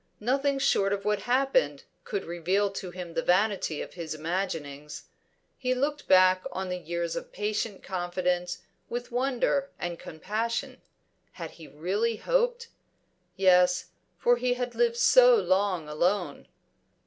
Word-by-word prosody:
Nothing 275 +5 +1
short 200 -7 +2
of 200 0 -4
what 210 -1 +1
had 240 - -6
happened 275 - +1 0.2
could 455 -4 -3
reveal 185 +4 0
to 195 -2 -6
him 175 -1 -8
the - - 0
vanity 185 -4 +1
of - - -11
his 165 -3 -5
imaginings. 155 -3 -4 0.6
He 255 -1 0
looked 290 +3 -2
back 185 0 +5
on 190 0 -4
the 180 0 -3
years 170 -1 -3
of - - -6
patient 210 -1 -3
confidence 180 -1 -2 0.3
with 245 +1 -5
wonder 270 +2 0
and 175 -1 -4
compassion. 230 - -3 0.5
Had - - -7
he 160 - -13
really 195 +11 -1
hoped? 485 - 0 0.7
Yes, 180 -2 +4 0.3
for 245 0 +3
he 245 0 0
had 245 -1 -3
lived 475 -1 +1
so - - +7
long 190 - +1
alone. 170 +1 -1
195 Hz, 140 wpm, -28 LUFS, 175-255 Hz, 0.7 s, so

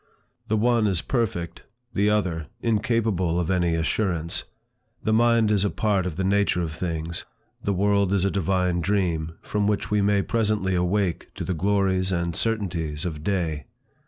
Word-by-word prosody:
The 110 - +1
one 115 0 +3
is 95 -4 0
perfect; 90 -9 -2 0.3
the 100 +1 +2
other, 90 -7 0
incapable 110 -6 +1
of 85 0 -1
any 85 -2 +2
assurance; 85 +1 -1 0.6
the 110 - +1
mind 115 -1 +4
is 100 -2 +3
a 100 - +2
part 100 -4 0
of 85 - -4
the 95 - -2
nature 100 -2 +2
of 80 -2 -4
things; 85 0 -3 0.4
the 100 - 0
world 100 0 +2
is 100 -1 +2
a 100 - +1
divine 90 -2 +1
dream, 85 -5 0
from 105 -1 0
which 105 0 -1
we 105 -1 +3
may 100 0 +2
presently 105 -4 0
awake 90 0 0
to - - -4
the 95 - -1
glories 95 +1 +1
and 85 -2 -1
certainties 85 -9 -1
of 75 -4 -4
day. 80 -7 -1
95 Hz, 165 wpm, -25 LUFS, 85-105 Hz, 0.6 s, mind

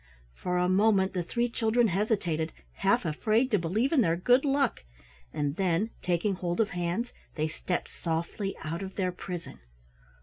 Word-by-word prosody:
For 180 - -2
a 180 0 +2
moment 195 0 +3
the 180 - 0
three 235 +8 0
children 230 0 +2
hesitated, 175 -5 0 0.2
half - - +2
afraid 220 - +1
to 210 - +4
believe 210 +11 0
in 305 -6 +4
their 165 -6 +3
good 245 +9 +4
luck, 275 - +1 0.5
and 145 +2 -2
then, 190 +3 +1
taking 180 +3 +1
hold 175 0 -3
of 220 -2 +3
hands 180 +7 -2 0.2
they 155 0 0
stepped 175 +3 -3
softly 170 +4 -2
out 165 +3 -3
of 190 -1 -6
their 185 -2 0
prison. 180 -1 -7
185 Hz, 165 wpm, -29 LUFS, 170-220 Hz, 0.5 s, to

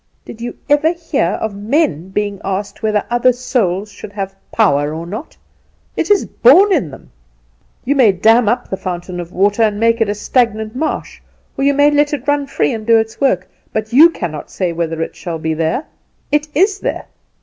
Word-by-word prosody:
Did 230 - -10
you 240 - -5
ever 300 +3 +3
hear 310 - -1
of 220 -2 -3
men 200 - 0
being 205 0 -3
asked 195 +1 -4
whether 215 -2 0
other 240 +1 +4
souls 215 -6 -1
should 205 - -11
have 195 -1 -4 0.2
power 150 -8 +2
or 165 +1 -6
not? 215 - -8 0.6
It - - -2
is 410 -1 +3
born 405 -4 +5
in 265 - 0
them. 135 - -14 0.7
You 280 +3 +1
may 245 -7 +5
dam 220 +4 +3
up 240 - -1
the 190 - -4
fountain 180 -1 -5
of 175 0 -7
water, 205 +4 +1
and 210 -2 +2
make 230 +1 +2
it 220 - +2
a 205 - -1
stagnant 220 0 0
marsh, 310 +4 -3 0.3
or - - -2
you 280 0 +3
may 290 +1 +4
let 290 0 +2
it 275 0 -11
run 290 -1 +1
free 150 - 0
and 220 - -5
do 230 +1 +4
its 220 +2 -2
work; 190 -10 +1 0.3
but 215 +1 -3
you 310 +6 +8
cannot 170 - -6
say 180 -3 -2
whether 165 -1 -2
it - - -7
shall 170 -3 -5
be 160 0 -2
there; 160 - -1 0.5
it 295 +1 +1
is 390 +5 +2
there. - - -3
220 Hz, 200 wpm, -16 LUFS, 185-275 Hz, 0.7 s, you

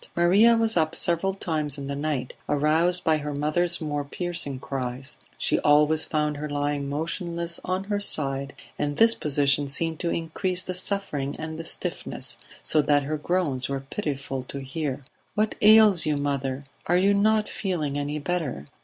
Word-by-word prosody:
Maria 200 +7 +5
was 225 -1 +3
up 155 -1 +1
several 175 +3 +2
times 155 -6 -1
in 140 - -6
the 140 0 -4
night, 145 -3 -3 0.2
aroused 160 +5 +2
by 160 -1 +3
her 150 -1 -5
mother's 170 +4 +3
more 145 -2 -2
piercing 145 -3 -4
cries; 130 +1 -5 0.2
she - - +1
always 150 +1 +4
found 150 -1 -1
her 150 +1 -5
lying 145 -1 -2
motionless 170 +3 -3
on 185 +1 -2
her 205 +1 -2
side, 140 -7 0 0.2
and 145 0 -2
this 225 0 +6
position 145 -4 +1
seemed 160 +3 -1
to 170 - -1
increase 180 +3 -2
the 185 - -4
suffering 180 -7 -2
and 160 0 -6
the - - -4
stiffness, - - -3 0.2
so 155 - +3
that 145 0 +2
her 150 +3 -2
groans 150 -5 -1
were 135 -1 -2
pitiful 140 -7 -3
to 130 +2 -8
hear. 140 0 -4 0.3
"What 215 0 +1
ails 210 -4 +7
you, 150 -1 +1
mother? 140 -1 -2 0.2
Are 175 - +3
you 195 +2 +3
not 215 +1 +2
feeling 165 -8 -3
any 145 +1 -2
better?" 150 - -3
155 Hz, 170 wpm, -25 LUFS, 140-180 Hz, 0.3 s, ails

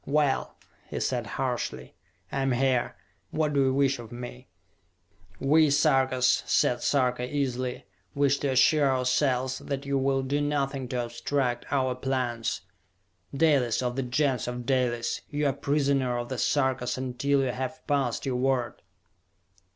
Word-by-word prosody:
"Well," 145 -2 +1 0.3
he - - -3
said - - -1
harshly, 65 0 -3 0.4
"I 135 - -1
am 135 -1 +1
here! 130 -1 +1 0.3
What 155 -1 0
do 140 - +3
you 130 - +3
wish 135 -1 +2
of 115 -2 -10
me?" 125 +1 -8 0.9
"We 155 +3 +4
Sarkas," 130 -3 +3
said 120 0 +2
Sarka 125 -2 +1
easily, 130 -3 -2 0.3
"wish 140 0 +2
to 145 - -1
assure 140 +2 +4
ourselves 130 0 +1
that 140 -1 -4
you 140 -1 0
will 135 0 +1
do 140 +2 0
nothing 140 -2 -1
to 120 -1 -2
obstruct 120 +1 -2
our 130 -2 +1
plans! 125 -3 -2 0.7
Dalis, 140 -6 +2
of 125 0 -1
the 135 - 0
Gens 130 0 0
of 125 0 -4
Dalis, 120 -3 0
you 150 0 -1
are 140 - +2
prisoner 140 -3 +1
of 120 0 -4
the 130 -2 -4
Sarkas 130 -3 +1
until 130 +2 0
you 130 - 0
have 130 +5 -5
passed 140 -5 0
your 130 -2 -1
word!" 125 -2 0
130 Hz, 150 wpm, -27 LUFS, 125-140 Hz, 0.9 s, We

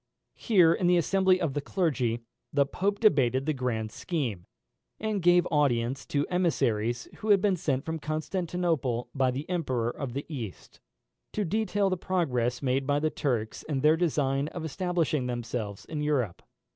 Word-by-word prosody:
Here, 180 -7 +5
in 180 - 0
the 180 0 +5
assembly 185 +2 +3
of 165 -6 -1
the 145 - -1
clergy, 135 - 0 0.3
the 140 -1 +3
Pope 200 +8 -1
debated 135 - +3
the 155 - +1
grand 115 -5 -2
scheme, 120 - -3 0.5
and 215 -2 -1
gave 175 0 +5
audience 130 -4 +1
to 145 0 0
emissaries 120 -10 0
who 215 - -5
had 200 -1 +7
been 195 0 +2
sent 140 -6 -1
from 160 0 -3
Constantinople 155 -5 -1
by 135 -2 +2
the 135 +4 -4
Emperor 130 -10 -1
of 130 -2 -5
the 140 +2 -4
East, 120 - -7 0.5
to 210 - -1
detail 205 +1 +1
the 185 - 0
progress 125 -10 -1
made 135 +1 0
by 145 0 +2
the 155 +1 0
Turks 115 -6 -2
in 140 -4 -2
their 155 +2 +5
design 145 -4 +1
of 160 +1 -6
establishing 160 -4 -1
themselves 115 -4 -4
in 155 -2 -4
Europe. 135 -11 0
150 Hz, 165 wpm, -28 LUFS, 125-175 Hz, 0.5 s, had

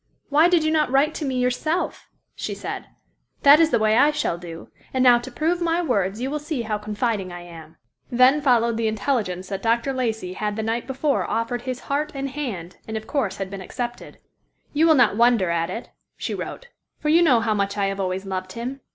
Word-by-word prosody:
"Why 305 +4 +5
did 345 -3 +3
you 310 - +1
not 305 -3 +2
write 280 +4 +3
to 305 - -4
me 265 -2 -2
yourself?" 250 +8 -1 0.2
she - - -5
said—"that 285 +2 +1
is 325 -1 +5
the 240 - +3
way 215 0 +3
I 290 +4 +6
shall 295 - -1
do, 170 -2 -9 0.3
and 260 - +3
now 245 -2 +7
to 240 +2 -8
prove 330 +7 0
my 340 +1 +1
words, 205 - 0
you 260 +3 -2
will 300 - -2
see 295 -4 -3
how 215 -2 -2
confiding 210 -2 -2
I 175 0 -7
am." 165 -2 -12 0.3
Then 255 +4 +5
followed 235 -4 +3
the 230 -1 0
intelligence 210 -5 -1
that 195 -1 -4
Dr. 235 +4 +1
Lacey 220 -7 -2
had 210 +1 -3
the 220 - -3
night 230 +2 -2
before 275 +2 0
offered 230 +1 -1
his 250 -1 -4
heart 295 +2 -2
and 275 0 -3
hand 220 - -5
and 220 0 -3
of 220 - -7
course 235 -10 -1
had 195 -1 -5
been 195 -1 -6
accepted. 240 +5 -6 0.6
"You 315 +3 +4
will 320 - +6
not 240 -6 +4
wonder 230 -7 +4
at 165 0 0
it," 225 +6 -6 0.3
she - - -3
wrote, - - -6 0.3
"for 300 - -2
you 330 +3 +5
know 270 -9 +5
how 225 -1 0
much 200 0 -1
I 200 - +1
have 195 0 -2
always 190 0 -2
loved 185 -1 -4
him. 255 +4 -5
240 Hz, 220 wpm, -23 LUFS, 200-280 Hz, 0.6 s, now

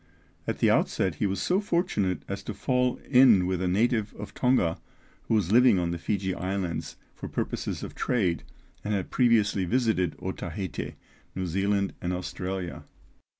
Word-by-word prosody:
At - - -1
the - - +4
outset 95 - +1
he 105 - +3
was 95 0 -2
so 185 +2 +2
fortunate 170 - 0
as 100 0 -4
to 110 - -5
fall 125 +2 +1
in 125 -8 +6
with 90 0 -1
a 95 - 0
native 110 +3 +1
of 105 - -8
Tonga 125 -10 +2 0.5
who 115 - +2
was 100 -4 +1
living 120 -2 +6
on 85 -1 0
the 85 - -3
Fiji 95 +2 -1
Islands 90 -1 -3 0.2
for - - -7
purposes - - -3
of - - -6
trade, 95 -9 0 0.4
and 105 0 -1
had 95 - -3
previously 110 -6 +3
visited 110 - +1
Otaheite, 95 -7 -5 0.4
New 95 - -2
Zealand, 100 +3 0
and 90 +1 -1
Australia. 90 0 -4
100 Hz, 160 wpm, -27 LUFS, 90-115 Hz, 0.5 s, in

